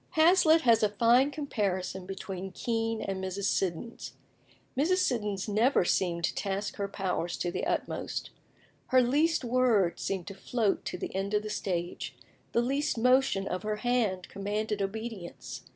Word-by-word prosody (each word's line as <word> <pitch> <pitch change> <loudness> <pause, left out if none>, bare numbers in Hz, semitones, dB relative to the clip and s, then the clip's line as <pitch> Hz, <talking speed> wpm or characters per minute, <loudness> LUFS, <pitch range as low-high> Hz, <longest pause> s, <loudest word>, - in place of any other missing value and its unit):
Hazlitt 325 0 +6
has 230 -4 +5
a 210 - +3
fine 235 +6 +4
comparison 195 -10 -2
between 190 0 -5
Kean 225 0 -1
and 190 -1 -3
Mrs. 190 +1 -3
Siddons. 195 +3 -2 0.6
Mrs. 320 +8 +2
Siddons 210 - 0
never 215 0 +3
seemed 175 -2 +1
to - - +1
task 200 0 -3
her 200 -1 -1
powers 185 -3 -2
to 175 - -1
the 185 - -2
utmost. - - -2 0.6
Her 255 -1 +5
least 300 +5 +2
word 235 -7 +2
seemed 190 -3 -2
to 195 - -7
float 210 +1 -1
to - - -3
the - - -5
end 195 +2 -1
of 210 - +1
the 215 - -4
stage; 175 -4 -3 0.4
the 235 - +2
least 275 +2 0
motion 250 -5 +3
of 180 - -2
her 215 +1 -1
hand 215 -5 0
commanded 205 +1 -2
obedience. 205 -2 -5
210 Hz, 155 wpm, -29 LUFS, 190-245 Hz, 0.6 s, Hazlitt